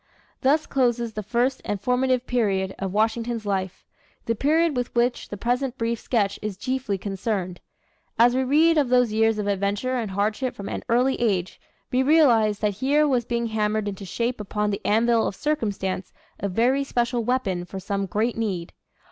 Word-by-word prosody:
Thus 290 +4 +3
closes 240 -3 0
the 215 - -4
first 240 +5 0
and 205 - -3
formative 250 +3 +1
period 195 -6 0
of 195 -1 -3
Washington's 225 +2 0
life 190 -2 -3 0.4
the 230 - +1
period 310 +6 +2
with 245 -1 -3
which 240 +1 0
the 205 - -6
present 250 +4 -1
brief 230 0 -1
sketch 200 -5 0
is 210 -3 -4
chiefly 255 -2 -2
concerned. 195 -2 -3 0.6
As 240 +1 +5
we 260 +1 +1
read 310 +5 +4
of 275 -4 +1
those 250 -3 +3
years 225 0 +2
of 210 - -2
adventure 205 +6 -1
and 225 -4 -2
hardship 210 +6 -1
from 200 - -6
an - - -4
early 250 +3 +2
age, 190 -5 -1 0.3
we 255 - +2
realize 250 -8 +4
that 205 - +1
here 295 +3 +3
was 250 -4 +1
being 235 0 -1
hammered 215 -1 -1
into 200 0 -5
shape 235 +4 -2
upon 210 0 -1
the 200 - -4
anvil 230 +1 +3
of - - -4
circumstance 205 -11 -2 0.3
a 200 - -2
very 245 +8 +2
special 240 -2 -1
weapon 215 -7 -1
for 190 +2 -7
some 200 +1 -2
great 220 +6 0
need. 195 -7 -3
230 Hz, 180 wpm, -24 LUFS, 205-250 Hz, 0.6 s, As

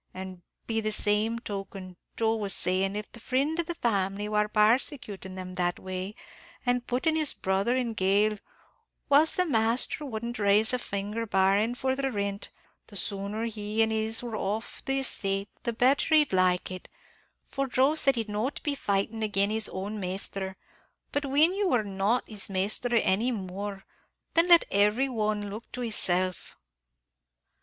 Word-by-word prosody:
an' 185 -1 -7 0.2
be 225 -1 -1
the 215 0 -1
same 210 +2 +2
token, 195 -4 -7 0.2
Joe 225 0 +1
was 200 -3 +2
sayin', 190 +2 +2
if 210 0 -6
the 235 - -11
frind 275 +8 -1
of 340 - 0
the 345 - -4
family 200 - -1
war 210 0 +1
parsecuting 210 -3 +1
them 185 -1 -7
that 175 -1 -1
way, 185 +2 -6 0.5
an' 245 0 +2
puttin' 260 +7 0
his 310 -2 0
brother 195 +6 0
in 240 -3 -1
gaol, 205 +1 +2 0.7
whilst 300 +6 +5
the 365 - +3
masthur 235 +1 +1
wouldn't 235 -2 -5
rise 210 +3 +4
a 250 - +1
finger, 210 +1 -4
barrin' 200 +4 +2
for 260 +1 -1
the 270 0 -1
rint, 200 -2 -3 0.4
the 205 - -13
sooner 200 +3 -3
he 215 -1 -1
an' 220 - 0
his 220 +1 0
were 235 -2 -5
off 215 +2 -4
the 270 0 0
estate, 195 -5 +1
the 235 - -1
betther 260 +7 +3
he'd 300 -8 +3
like 185 -1 +2
it; 185 -1 -8 0.6
for 275 0 -2
Joe 265 +3 +3
sed 275 -4 +4
he'd 225 -2 -2
not 215 +6 -2
be 295 - 0
fightin' 215 -3 -1
agin 205 -1 +2
his 220 0 +1
own 200 +3 -5
masthur, 190 +1 -3 0.6
but 285 0 -1
whin 300 +6 +4
you 400 0 0
war 245 -9 +2
not 200 +4 0
his 210 -3 -2
masthur 200 +5 0
any 220 +7 +2
more, 195 -1 -5 0.5
then 335 +1 +4
let 345 -1 +7
every 210 +7 +2
one 210 -3 -2
look 220 +4 -9
to 250 - -5
hisself." 185 -5 +1
215 Hz, 165 wpm, -28 LUFS, 195-245 Hz, 0.7 s, let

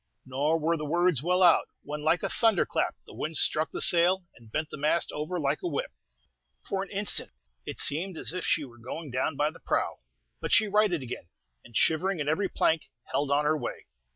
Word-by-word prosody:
Nor 140 +5 0
were 165 +2 +1
the 150 - -5
words 170 -1 +2
well 180 +3 +2
out, 175 -2 +5 0.2
when, 150 +1 -5
like 160 +3 +2
a - - 0
thunder 225 -6 +2
clap, - - -1
the - - -13
wind 155 0 -3
struck 155 +2 +3
the - - -3
sail, 180 +2 +3
and 115 -1 -18
bent 155 +3 -2
the - - -5
mast 155 +3 +1
over 155 +4 -3
like 145 0 0
a - - -2
whip. 145 -5 -3 0.8
For 195 - -1
an 195 - -6
instant 205 0 +3 0.4
it - - -6
seemed 165 +4 +3
as - - -2
if 185 - -4
she 155 - +1
were 120 -2 -15
going 135 +5 -7
down 130 +4 -1
by 150 +2 +1
the - - -15
prow; - - -1 0.4
but - - -4
she 220 - +5
righted 205 -7 +2
again, 120 -8 -7 0.3
and, 115 - -5
shivering 175 +3 +1
in 145 - -2
every 185 +6 +1
plank, 160 -4 +1 0.2
held 140 0 0
on 145 +1 +2
her 155 +1 +3
way. 150 - -5
160 Hz, 215 wpm, -28 LUFS, 145-180 Hz, 0.8 s, out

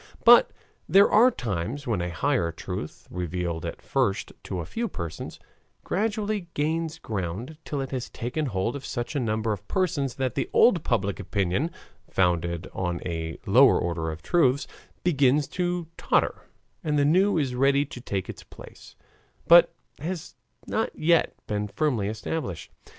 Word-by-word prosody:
But - - +8 0.4
there 200 +1 +6
are 235 +4 +7
times 120 - -4
when 110 -7 0
a 90 - -2
higher 120 -2 0
truth, 85 -1 -7
revealed 85 -1 -3
at - - -7
first 130 -8 0
to 95 - -3
a 85 - -4
few 235 - -3
persons, 85 - -6 0.4
gradually 210 -2 -1
gains 160 +2 -1
ground 110 - -5
till 145 -2 -3
it 135 - -5
has 130 -2 -3
taken 135 +6 -3
hold 105 +2 -1
of 140 - -6
such 120 +3 -4
a - - +1
number 110 -2 0
of 100 - -9
persons 145 -9 0
that 130 -2 -1
the - - -2
old 180 -10 +5
public 100 -5 0
opinion, 100 - 0 0.4
founded 85 -1 0
on 90 -2 -2
a 80 -2 -3
lower - - +6
order 80 -2 -2
of 80 0 -7
truths, 140 -5 +3 0.4
begins 145 -3 +3
to 175 -1 -1
totter - - +1 0.4
and 150 -1 0
the 145 - +3
new 185 +6 +4
is 135 -5 0
ready 140 +3 +3
to 135 -4 -10
take 100 -6 -3
its - - -8
place, - - -14 0.5
but 170 0 +8 0.3
has 165 +3 -5 0.3
not - - -1
yet 170 +2 +3
been 105 0 -2
firmly 120 -4 0
established. 110 - -4
125 Hz, 155 wpm, -26 LUFS, -, 0.5 s, But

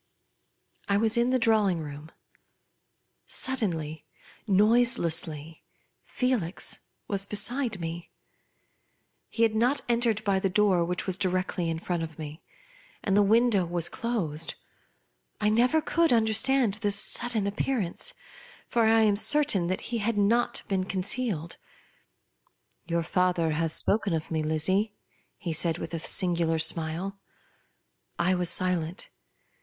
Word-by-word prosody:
I 200 - +3
was 220 +2 +2
in 240 +1 +2
the 255 - +3
drawing 215 -7 +2
room. 150 0 -8 1.2
Suddenly, 165 - -1 0.4
noiselessly, 175 -8 +1 0.4
Felix 240 -9 -1 0.3
was 200 -1 +1
beside 225 +1 0
me. 165 0 -6 1.2
He 230 - 0
had 225 -1 +3
not 245 +6 +2
entered 235 -3 +1
by 195 -2 +1
the 195 - 0
door 190 -2 +3
which 180 +1 -3
was 190 0 -2
directly 185 -2 -1
in 165 - -2
front 175 +1 -3
of 160 -2 -6
me; 155 0 -8 0.6
and 195 - +1
the 205 - +5
window 220 -1 +3
was 170 -1 -1
closed. 165 -10 -2 0.8
I 210 - +2
never 250 +8 +3
could 335 -1 +2
understand 225 +1 +3
this 205 -2 +1
sudden 225 0 +1
appear 210 +6 -1
ance; 215 - -2 0.5
for 235 -1 +2
I 225 0 +5
am 210 -2 +3
certain 230 -6 +2
that 185 - -2
he 235 -1 -3
had 220 +1 -1
not 225 +4 +2
been 190 -2 0
conceal^jd. 190 -2 -3 0.7
" - - -39
Your 170 0 0
father 175 -1 +1
has 160 +1 -1
spoken 205 -3 0
of 160 +1 -5
me, 160 -1 0
Lizzie 185 +7 0 0.2
?" - - -38
he 170 -5 -4
said 165 +1 0
with - - -7
a 165 - -2
singular 170 -1 +1
smile. 165 +4 -1 1.0
I 180 +2 +2
was 180 -2 0
silent. 180 -2 0
195 Hz, 135 wpm, -27 LUFS, 165-225 Hz, 1.2 s, the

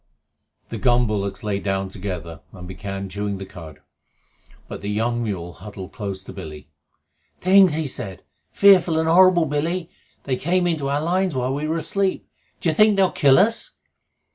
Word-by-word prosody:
The - - -5
gun 125 -1 +3
bullocks 100 0 -3
lay 105 -2 -1
down 95 -1 -2
together 90 -5 -6
and 90 -2 -10
began 100 +1 -6
chewing 100 +1 -4
the 95 - -7
cud, 80 -5 -12 0.9
but - - -8
the 100 - -4
young 115 +3 -1
mule 90 -6 -4
huddled 95 +3 -10
close 100 -4 -5
to - - -10
Billy. 75 -1 -9 0.7
"Things!" 185 -3 +5
he 160 0 -1
said. 105 -9 -5 0.3
"Fearful 185 -5 +5
and 160 0 +1
horrible, 175 0 +5
Billy! 165 +4 -2 0.3
They 130 -2 -2
came 175 +5 0
into 155 -5 -1
our 145 +1 0
lines 180 -1 0
while 130 +1 -1
we 145 +2 -3
were 160 +2 -1
asleep. 195 +3 -1 0.3
D'you 165 - +1
think 210 +4 +4
they'll 190 -1 +3
kill 135 -2 +4
us?" 220 +5 +2
125 Hz, 165 wpm, -22 LUFS, -, 0.9 s, Things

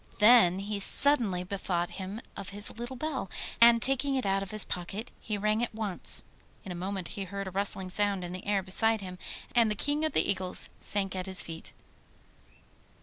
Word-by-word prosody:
Then 210 -4 +6
he 200 +1 -4
suddenly 210 -5 +3
bethought 180 -2 -3
him 195 +5 -6
of 200 -1 -6
his 205 +3 -1
little 240 +2 -6
bell, 270 - -4 0.3
and 235 0 +7
taking 270 +3 0
it 260 - -2
out 195 0 0
of 195 - -6
his 215 -1 +2
pocket 195 +6 -5
he 210 -2 -4
rang 215 +2 0
it 240 -2 -3
once. 210 -5 +2 0.4
In 190 - -7
a - - -4
moment 185 0 -5
he 195 - -6
heard 195 +1 -6
a - - -6
rustling 190 -1 -2
sound 200 -1 +1
in 175 - -6
the 185 +2 -8
air 200 -2 0
beside 220 +4 +1
him, 185 -1 -9 0.3
and 235 -2 +3
the 210 - -1
King 290 +7 0
of 315 - -1
the - - +2
Eagles 185 -2 +1
sank 195 -2 +2
at 185 0 -4
his 190 -1 +7
feet. 165 -1 -8
200 Hz, 200 wpm, -28 LUFS, 185-225 Hz, 0.4 s, and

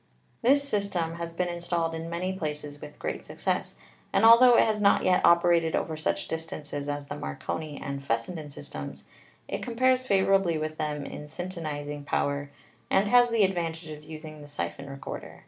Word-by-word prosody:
This 280 +3 +4
system 190 -8 -1
has 170 0 -4
been 180 +2 -1
installed 170 -1 -1
in 165 0 -5
many 180 +3 -2
places 150 -4 -5
with 150 - -10
great - - -4
success, - - -2 0.4
and - - +4
altho 235 +2 +9
it - - +7
has 215 -2 0
not 200 - +5
yet 185 -1 +3
operated 170 -1 +5
over 160 - -1
such 155 - -1
distances 150 -3 -5
as 145 0 -3
the - - -6
Marconi 105 - -5
and 140 0 -5
Fessenden 145 +6 -2
systems, 140 - -8 0.4
it - - -3
com 240 -2 -5
pares 255 +1 +3
favorably 195 -4 +3
with 155 0 -4
them 150 -2 -2
in 150 - -7
syntonizing 150 -3 -5
power, 140 0 -1 0.4
and 200 +1 +3
has 245 +1 +6
the 230 -3 +3
advantage 165 -3 -1
of 150 0 -9
using 155 0 -9
the 145 - -10
siphon 85 +2 -5
recorder. 135 0 -7
165 Hz, 175 wpm, -28 LUFS, 150-190 Hz, 0.4 s, altho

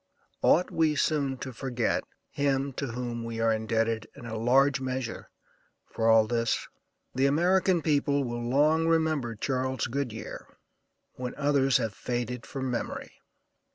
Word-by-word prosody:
Ought 180 - +4
we 160 -2 +2
soon 140 -3 +1
to 130 - -7
forget 120 -1 -1 0.3
him 140 -1 0
to 140 - -3
whom 120 -1 -4
we 115 0 -5
are 115 0 +3
indebted, 110 0 0
in - - -11
a 115 -1 -5
large 130 +4 +3
measure, 130 -2 -4 0.6
for 115 0 +1
all 110 -1 +6
this? 115 0 0 0.5
The 135 +2 +3
American 175 +3 +3
people 145 -2 +2
will 120 -1 -3
long 155 +5 +3
remember 155 -8 +1
Charles 130 +3 -1
Goodyear 120 -3 -4 0.7
when 125 -1 -5
others 140 -2 +3
have 115 -4 -2
faded 120 +1 -4
from 130 -2 -3
memory. 120 - -4
130 Hz, 140 wpm, -28 LUFS, 115-140 Hz, 0.7 s, all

